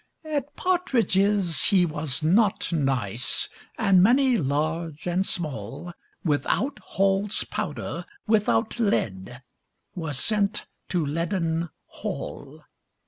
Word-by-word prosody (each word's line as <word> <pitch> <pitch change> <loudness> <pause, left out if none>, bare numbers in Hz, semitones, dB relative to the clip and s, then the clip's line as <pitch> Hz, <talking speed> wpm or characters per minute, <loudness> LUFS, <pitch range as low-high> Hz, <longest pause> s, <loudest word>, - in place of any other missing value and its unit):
At 290 -2 -3
partridges 205 - +2
he 190 -4 +5
was 150 -2 -2
not 195 +2 +3
nice; 130 -7 0 0.3
And 195 -5 +5
many, 255 +5 +5
large 155 - -1
and 180 +2 +1
small, 155 - -4 0.3
Without 185 - 0
Hall's 195 +1 0
powder, - - -4 0.2
without 210 - +2
lead, 125 - -1 0.5
Were 160 -4 -4
sent 205 - 0 0.2
to 175 -4 +1
Leaden 165 +2 -1 0.2
Hall. - - -6
175 Hz, 95 wpm, -26 LUFS, 150-210 Hz, 0.5 s, he